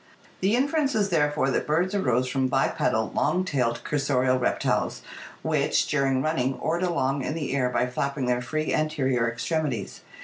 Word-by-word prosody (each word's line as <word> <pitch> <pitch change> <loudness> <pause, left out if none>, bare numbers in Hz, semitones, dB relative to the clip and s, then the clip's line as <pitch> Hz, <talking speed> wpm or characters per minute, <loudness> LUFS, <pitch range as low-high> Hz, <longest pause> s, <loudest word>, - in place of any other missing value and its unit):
The 195 +4 +2
inference 280 +1 +1
is 205 -2 +1
therefore 150 -5 +1
that - - -1
birds 175 +6 +1
arose 130 - +1
from 130 0 0
bipedal 125 -4 0
long 185 +1 +1
tailed 120 -7 -1
cursorial 130 -3 +1
reptiles - - 0 0.4
which, - - +1
during 135 -3 +1
running, 135 -4 0
oared 170 +2 -1
along 140 -7 0
in 150 - -3
the 145 -4 -2
air 125 -2 +1
by 125 - +1
flapping 140 +2 -2
their 125 0 +1
free 155 +5 -2
anterior 135 -6 +1
extremities. 125 - -3
140 Hz, 160 wpm, -26 LUFS, 125-160 Hz, 0.4 s, The